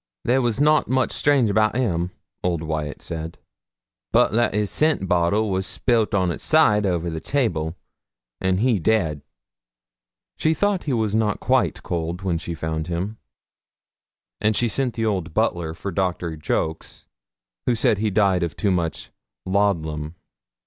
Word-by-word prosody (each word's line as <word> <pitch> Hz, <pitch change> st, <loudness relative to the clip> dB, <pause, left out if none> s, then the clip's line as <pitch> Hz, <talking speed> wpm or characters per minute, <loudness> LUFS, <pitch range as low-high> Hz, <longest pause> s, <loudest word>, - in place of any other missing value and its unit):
'There 130 Hz, +2 st, +3 dB
was 120 Hz, -1 st, 0 dB
nout 150 Hz, +1 st, +4 dB
much 130 Hz, 0 st, +1 dB
strange 140 Hz, -5 st, +3 dB
about 110 Hz, +2 st, +2 dB
him,' 90 Hz, -9 st, 0 dB, 0.3 s
old 85 Hz, -3 st, 0 dB
Wyat 80 Hz, -2 st, -4 dB
said, 80 Hz, 0 st, -6 dB, 0.7 s
'but -, -, +4 dB
that 115 Hz, -1 st, +1 dB
his 105 Hz, -1 st, 0 dB
scent 155 Hz, -11 st, +2 dB
bottle 95 Hz, +4 st, +2 dB
was 95 Hz, 0 st, 0 dB
spilt 115 Hz, -4 st, +1 dB
on 90 Hz, -3 st, +2 dB
its -, -, -6 dB
side 105 Hz, -10 st, +4 dB
over 85 Hz, -2 st, -1 dB
on 85 Hz, -, -3 dB
the 80 Hz, -, -3 dB
table, 80 Hz, -, -1 dB, 0.6 s
and 95 Hz, +1 st, +1 dB
he 120 Hz, -4 st, +2 dB
dead.' 80 Hz, -6 st, +1 dB, 1.2 s
She 160 Hz, +1 st, +2 dB
thought 205 Hz, -1 st, 0 dB
he 145 Hz, -, 0 dB
was 110 Hz, -3 st, 0 dB
not 110 Hz, -2 st, +1 dB
quite -, -, +1 dB
cold 85 Hz, +2 st, -3 dB
when 85 Hz, -4 st, 0 dB
she 85 Hz, 0 st, -5 dB
found 80 Hz, 0 st, -3 dB
him, 90 Hz, +6 st, -3 dB, 1.2 s
and 110 Hz, 0 st, +1 dB
she 120 Hz, -, +2 dB
sent 125 Hz, +1 st, -1 dB
the 115 Hz, -1 st, -1 dB
old 95 Hz, -7 st, -2 dB
butler 80 Hz, -2 st, 0 dB
for 100 Hz, +4 st, -5 dB
Doctor 90 Hz, -3 st, -1 dB
Jolks, 80 Hz, +1 st, -3 dB, 0.6 s
who 120 Hz, -, +3 dB
said 110 Hz, -2 st, +2 dB
he 110 Hz, 0 st, +1 dB
died 95 Hz, -2 st, +2 dB
of 85 Hz, -1 st, -2 dB
too 100 Hz, -, +1 dB
much 85 Hz, -3 st, -2 dB, 0.3 s
'loddlum.' 80 Hz, -6 st, 0 dB
95 Hz, 160 wpm, -23 LUFS, 85-110 Hz, 1.2 s, nout